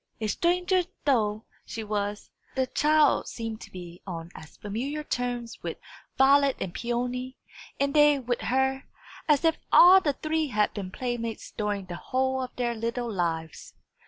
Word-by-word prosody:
A 220 - -2
stranger 360 - +2 0.2
though 215 -6 +1 0.2
she 225 - -6
was, 205 -1 -3 0.2
the 260 -1 +2
child 300 +2 +3
seemed 225 -1 -5
to - - -11
be 175 -1 -10
on 170 -2 -6
as 155 - -12
familiar 260 +9 -4
terms 245 -3 -3
with - - -4 0.4
Violet 275 0 +5
and 175 - -4
Peony, 250 +2 -3 0.4
and 280 0 +1
they 295 -1 +6
with 245 -2 -2
her, 265 +1 0 0.4
as 300 0 +3
if 325 0 +3
all 370 +2 +9
the 290 -5 +1
three 310 +2 -1
had 210 -5 +1
been 195 -3 -5
playmates 230 +1 -4
during 205 -2 -2
the 175 -1 -6
whole 260 +3 -1
of 255 - -4
their 240 -1 -1
little 230 +1 -3
lives. 165 -4 -3
245 Hz, 160 wpm, -27 LUFS, 210-280 Hz, 0.4 s, all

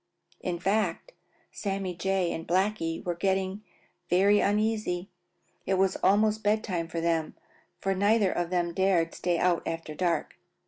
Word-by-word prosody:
In 175 -1 -3
fact, 190 0 -1 0.4
Sammy 195 -2 -3
Jay 190 0 0
and 165 - -6
Blacky 185 -2 0
were 175 - 0
getting 190 +2 -1 0.5
very 200 +4 +4
uneasy. 210 -3 0 0.6
It 190 - +2
was 190 0 +2
almost 215 +2 +3
bed 215 +1 +1
time 175 -5 -2
for 165 0 -4
them, 165 -1 0 0.4
for 195 +1 0
neither 200 0 +3
of 175 -1 -2
them 175 -1 0
dared 180 -3 +2
stay 175 -1 0
out 175 0 +2
after 165 -1 -4
dark. 170 +1 -1
185 Hz, 145 wpm, -28 LUFS, 170-200 Hz, 0.6 s, very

